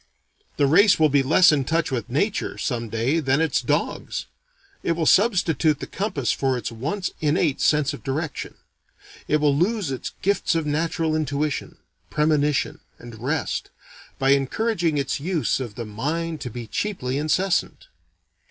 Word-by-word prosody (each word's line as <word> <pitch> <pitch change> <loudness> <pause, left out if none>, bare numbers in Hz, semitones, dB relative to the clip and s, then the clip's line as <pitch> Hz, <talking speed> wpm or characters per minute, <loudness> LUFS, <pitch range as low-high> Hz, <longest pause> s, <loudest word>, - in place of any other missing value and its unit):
The 145 - +3
race 185 +8 +5
will 155 -1 +5
be 140 0 +3
less 160 +6 +5
in 145 -3 +1
touch 165 +3 0
with 125 -1 -3
Nature, 195 - -1
some 120 -5 -2
day, 115 +9 0
than 135 -1 +1
its 160 0 +1
dogs. - - -2 0.6
It 170 - 0
will 165 -1 -1
substitute 175 - +3
the - - -5
compass 145 - -2
for 135 -2 0
its 120 -1 -4
once 155 - -3
innate 150 -1 +1
sense 150 -2 +2
of - - -8
direction. 145 +3 -4 0.7
It 150 - +3
will 145 -2 +2
lose 185 0 0
its 130 - -5
gifts 200 -3 +1
of 165 -2 0
natural 160 +1 0
intuition, 150 -1 -2 0.3
premonition, 150 -2 +1 0.2
and 120 -2 -11
rest, 145 +5 -2 0.5
by 135 0 +2
encouraging 165 - +1
its 140 0 -1
use 165 -1 0
of 120 -6 -6
the 120 - -5
mind 155 +9 -3
to 130 - -4
be 120 +1 -7
cheaply 135 - -2
incessant. 180 - 0
150 Hz, 155 wpm, -23 LUFS, 135-165 Hz, 0.7 s, race